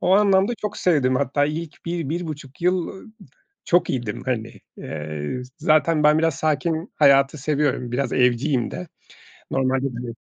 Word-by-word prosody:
O 180 Hz, -, +2 dB
anlamda 200 Hz, +1 st, +4 dB
çok 210 Hz, -1 st, -4 dB
sevdim. 140 Hz, -8 st, +2 dB
Hatta 140 Hz, +2 st, +1 dB
ilk 155 Hz, +2 st, -5 dB
1-1,5 160 Hz, -3 st, -4 dB
yıl, 180 Hz, -1 st, +1 dB
ııı, 190 Hz, -, -10 dB, 0.6 s
çok 175 Hz, +1 st, +3 dB
iyiydim. 120 Hz, -6 st, -3 dB
Hani, 115 Hz, -4 st, -3 dB, 0.2 s
eee, 75 Hz, -, -5 dB, 0.2 s
zaten 155 Hz, -1 st, +3 dB
ben 150 Hz, +1 st, +5 dB
biraz 165 Hz, -3 st, +1 dB
sakin 160 Hz, +4 st, -1 dB
hayatı 140 Hz, 0 st, +4 dB
seviyorum. 140 Hz, -4 st, -1 dB
Biraz 135 Hz, +3 st, -1 dB
evciyim 125 Hz, +1 st, +1 dB
de 180 Hz, -, -6 dB, 0.6 s
normalde 130 Hz, 0 st, +1 dB
bile 120 Hz, -1 st, -5 dB
150 Hz, 140 wpm, -22 LUFS, 130-165 Hz, 0.6 s, ben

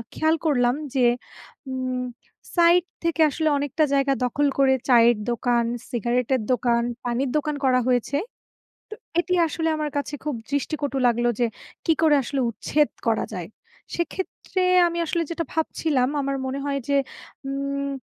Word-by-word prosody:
খেয়াল 315 Hz, +1 st, +2 dB
করলাম 245 Hz, -4 st, +3 dB, 0.2 s
যে 255 Hz, -, +4 dB, 0.7 s
উম 255 Hz, -1 st, -2 dB, 0.6 s
সাইড 345 Hz, 0 st, +5 dB, 0.2 s
থেকে 335 Hz, -1 st, +1 dB
আসলে 315 Hz, +1 st, 0 dB
অনেকটা 290 Hz, +2 st, 0 dB
জায়গা 275 Hz, 0 st, +3 dB
দখল 285 Hz, +4 st, +1 dB
করে 265 Hz, -1 st, +5 dB, 0.2 s
চায়ের 235 Hz, -2 st, +6 dB
দোকান, 235 Hz, 0 st, +1 dB, 0.3 s
সিগারেটের 245 Hz, +2 st, 0 dB
দোকান, 235 Hz, 0 st, +1 dB, 0.2 s
পানির 245 Hz, +2 st, 0 dB
দোকান 300 Hz, 0 st, -1 dB
করা 255 Hz, -1 st, +4 dB
হয়েছে। 250 Hz, +3 st, +1 dB, 0.7 s
তো 430 Hz, -, -5 dB, 0.2 s
এটি 360 Hz, +1 st, 0 dB
আসলে 320 Hz, +1 st, -1 dB
আমার 305 Hz, -1 st, -2 dB
কাছে 285 Hz, +1 st, -3 dB
খুব 295 Hz, -4 st, -1 dB, 0.2 s
দৃষ্টিকটু 285 Hz, -1 st, -1 dB
লাগলো 240 Hz, 0 st, +2 dB
যে 240 Hz, -, +3 dB, 0.4 s
কী 325 Hz, -, +4 dB
করে 305 Hz, -2 st, +6 dB
আসলে 270 Hz, +2 st, -2 dB
উচ্ছেদ 295 Hz, +6 st, +1 dB, 0.2 s
করা 220 Hz, -, +1 dB
যায়? 175 Hz, 0 st, -6 dB, 0.5 s
সেক্ষেত্রে 370 Hz, +2 st, -3 dB, 0.3 s
আমি 340 Hz, -, -3 dB
আসলে 335 Hz, +1 st, 0 dB
যেটা 335 Hz, 0 st, -2 dB
ভাবছিলাম 300 Hz, -5 st, 0 dB
আমার 275 Hz, 0 st, -1 dB
মনে 270 Hz, +2 st, -3 dB
হয় 280 Hz, -1 st, -1 dB
যে 280 Hz, -, +3 dB, 0.5 s
উম 280 Hz, 0 st, -2 dB
275 Hz, 145 wpm, -24 LUFS, 245-310 Hz, 0.7 s, চায়ের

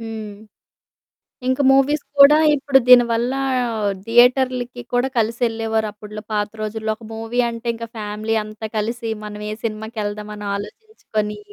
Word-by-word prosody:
హ్మ్. 220 Hz, -2 st, -7 dB, 1.1 s
ఇంక 260 Hz, +1 st, +1 dB
మూవీస్ 275 Hz, +2 st, +3 dB, 0.2 s
కూడా 280 Hz, +2 st, +9 dB, 0.2 s
ఇప్పుడు 280 Hz, -1 st, +3 dB
దీని 250 Hz, -1 st, +8 dB
వల్లా 245 Hz, +4 st, 0 dB, 0.7 s
థియేటర్లకి 245 Hz, +1 st, +3 dB
కూడా 245 Hz, +2 st, +2 dB
కలిసెళ్ళేవోరప్పడ్లో. 220 Hz, -2 st, -2 dB
పాత 210 Hz, 0 st, 0 dB
రోజుల్లో 220 Hz, 0 st, -3 dB
ఒక 220 Hz, +1 st, -14 dB
మూవీ 225 Hz, +2 st, -1 dB
అంటే, 230 Hz, 0 st, -7 dB
ఇంక 230 Hz, 0 st, -6 dB
ఫ్యామిలీ 215 Hz, +1 st, -3 dB
అంతా 215 Hz, +1 st, -7 dB
కలిసి, 230 Hz, +2 st, -2 dB
మనవే 210 Hz, 0 st, -6 dB
సినిమాకెళ్దామని 210 Hz, -2 st, -5 dB
ఆలోచించుకొనీ 210 Hz, -, -5 dB
225 Hz, 115 wpm, -20 LUFS, 215-245 Hz, 1.1 s, కూడా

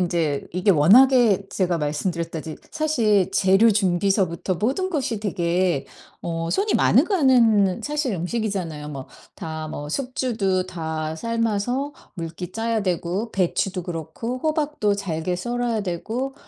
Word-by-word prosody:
인제 165 Hz, -5 st, 0 dB
이게 185 Hz, +3 st, +2 dB
워낙에 205 Hz, -, +5 dB
제가 180 Hz, -3 st, 0 dB
말씀드렸다드 160 Hz, +1 st, -3 dB, 0.2 s
사실 230 Hz, -, +2 dB
재료 195 Hz, +4 st, +5 dB
준비서부터 190 Hz, -2 st, +1 dB
모든 275 Hz, -, -1 dB
것이 265 Hz, -, -1 dB
되게 175 Hz, -5 st, 0 dB, 0.4 s
어 165 Hz, 0 st, -3 dB
손이 405 Hz, +2 st, +1 dB
많이 -, -, +5 dB
가는 235 Hz, -, +3 dB
사실 295 Hz, -6 st, -1 dB
음식이잖아요. 180 Hz, -5 st, -3 dB
뭐 135 Hz, -3 st, -7 dB, 0.3 s
다 160 Hz, -1 st, -5 dB
뭐 145 Hz, -1 st, -6 dB
숙주도 215 Hz, -, -1 dB
다 160 Hz, -3 st, -4 dB
삶아서 230 Hz, -, -1 dB, 0.2 s
물기 170 Hz, 0 st, -6 dB
짜야 225 Hz, 0 st, -1 dB
되고 180 Hz, +5 st, -2 dB
배추도 185 Hz, 0 st, 0 dB
그렇고 175 Hz, -, -5 dB
호박도 300 Hz, -8 st, 0 dB
잘게 180 Hz, -3 st, -3 dB
썰어야 240 Hz, +3 st, -1 dB
되고 225 Hz, +9 st, -3 dB
195 Hz, 280 characters per minute, -23 LUFS, 170-235 Hz, 0.4 s, 워낙에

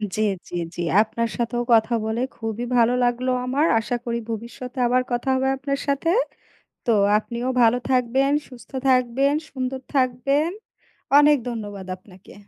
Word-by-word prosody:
জি, 215 Hz, -, -1 dB, 0.3 s
জি, -, -, -6 dB, 0.2 s
জি 175 Hz, -, -4 dB, 0.2 s
আপনার 230 Hz, +1 st, -1 dB
সাথেও 240 Hz, 0 st, -1 dB
কথা 225 Hz, +1 st, +4 dB
বলে 220 Hz, +2 st, -1 dB
খুবই 225 Hz, +1 st, -4 dB
ভালো 235 Hz, +1 st, +4 dB
লাগলো 245 Hz, +1 st, +1 dB
আমার। 280 Hz, +5 st, +1 dB
আশা 245 Hz, +2 st, -2 dB
করি 235 Hz, 0 st, -1 dB
ভবিষ্যতে 235 Hz, +3 st, -6 dB
আবার 250 Hz, +1 st, +3 dB
কথা 240 Hz, +2 st, -2 dB
হবে 265 Hz, +1 st, +1 dB
আপনার 275 Hz, +1 st, -2 dB
সাথে। 280 Hz, +4 st, 0 dB, 0.8 s
তো 235 Hz, -, +2 dB, 0.3 s
আপনিও 235 Hz, +3 st, -4 dB, 0.2 s
ভালো 230 Hz, +2 st, +4 dB
থাকবেন, 260 Hz, +2 st, +2 dB, 0.2 s
সুস্থ 240 Hz, -1 st, -14 dB, 0.2 s
থাকবেন, 255 Hz, +2 st, +3 dB, 0.2 s
সুন্দর 260 Hz, 0 st, -4 dB
থাকবেন। 275 Hz, +5 st, +1 dB, 0.7 s
অনেক 295 Hz, 0 st, +6 dB
ধন্যবাদ 205 Hz, -4 st, -6 dB
আপনাকে। 185 Hz, 0 st, -17 dB
245 Hz, 145 wpm, -23 LUFS, 230-265 Hz, 0.8 s, অনেক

